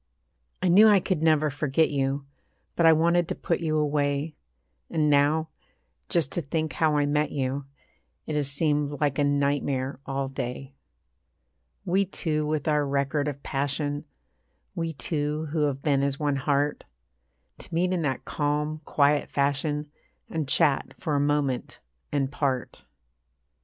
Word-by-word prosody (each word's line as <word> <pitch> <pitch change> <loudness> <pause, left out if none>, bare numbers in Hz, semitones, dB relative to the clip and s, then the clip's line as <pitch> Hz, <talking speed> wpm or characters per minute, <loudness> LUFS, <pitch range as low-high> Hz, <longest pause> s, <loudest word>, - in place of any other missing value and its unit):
I - - +3
knew 200 +5 +7
I 205 -2 +6
could 180 -3 -1
never 155 -2 +3
forget 150 +2 +1
you; 140 0 -1 0.5
But 170 - +4
I - - +9
wanted 170 +2 +3
to - - -3
put 170 - -1
you 155 -2 0
away. 145 0 0 0.6
And 155 -3 +2
now, 150 +3 +3 0.6
just 165 -5 +1
to 175 - -2
think 155 0 -2
how 155 -2 +2
I 145 - +2
met 150 +1 +1
you 135 0 -2 0.6
It 155 - -3
has 145 -2 0
seemed 145 -1 0
like 145 -2 0
a - - +4
nightmare 140 -2 0
all 135 0 -2
day. 135 +1 -5 1.1
We 190 +2 +2
two 155 -5 -1
with 155 -1 -1
our 150 -1 +3
record 140 +1 0
of 140 -1 -5
passion, 145 +2 -2 0.7
We 165 -1 -3
two 150 +1 -2
who 155 -1 +1
have 140 -1 -2
been 140 -3 +2
as 140 0 -1
one 145 -2 0
heart, 145 +1 0 0.8
To - - -13
meet 180 +2 +1
in 180 - 0
that 135 -5 -2
calm, 150 +1 -1
quiet 145 0 +2
fashion, 145 +1 -1 0.4
And 160 -4 -2
chat 135 +1 +2
for 155 - -3
a - - +2
moment 145 -3 0 0.3
and 140 -2 0
part. 135 -4 -2
145 Hz, 150 wpm, -26 LUFS, 140-155 Hz, 1.1 s, I